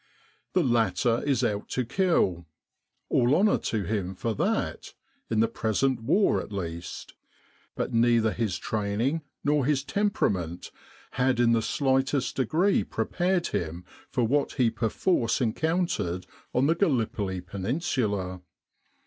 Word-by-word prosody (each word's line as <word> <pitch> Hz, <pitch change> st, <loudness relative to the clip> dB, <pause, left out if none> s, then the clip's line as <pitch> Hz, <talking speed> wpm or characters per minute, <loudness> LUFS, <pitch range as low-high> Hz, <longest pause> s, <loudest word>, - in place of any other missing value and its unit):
The 180 Hz, -, +3 dB
latter 115 Hz, -, +2 dB
is 130 Hz, -3 st, +2 dB
out 105 Hz, -3 st, -1 dB
to 125 Hz, -, -1 dB
kill 110 Hz, -, +1 dB, 0.6 s
all 125 Hz, +4 st, +3 dB
honour 200 Hz, +5 st, +3 dB
to 110 Hz, -3 st, -2 dB
him 95 Hz, -1 st, -2 dB
for 115 Hz, +4 st, -2 dB
that -, -, -2 dB, 0.3 s
in 110 Hz, -1 st, +2 dB
the 115 Hz, -, +4 dB
present 115 Hz, +3 st, 0 dB
war 185 Hz, -, +2 dB
at -, -, -10 dB
least 85 Hz, -3 st, -6 dB, 0.6 s
but -, -, -3 dB
neither 115 Hz, -1 st, +3 dB
his 110 Hz, -6 st, -1 dB
training 110 Hz, +9 st, -1 dB, 0.2 s
nor 145 Hz, -1 st, +2 dB
his 135 Hz, 0 st, +1 dB
temperament 105 Hz, -, -1 dB, 0.4 s
had 125 Hz, -1 st, +1 dB
in 120 Hz, -1 st, +4 dB
the 115 Hz, -1 st, +3 dB
slightest 135 Hz, +1 st, 0 dB
degree 165 Hz, -, +2 dB
prepared 180 Hz, -1 st, -1 dB
him 85 Hz, +2 st, -3 dB, 0.2 s
for 125 Hz, -, 0 dB
what 140 Hz, +5 st, +1 dB
he 125 Hz, -5 st, +2 dB
perforce 115 Hz, -, 0 dB
encountered 130 Hz, -, -1 dB, 0.3 s
on 125 Hz, +2 st, +2 dB
the 160 Hz, -, +4 dB
Gallipoli 115 Hz, -, 0 dB
Peninsula. 100 Hz, -, -2 dB
120 Hz, 130 wpm, -27 LUFS, 100-145 Hz, 0.6 s, the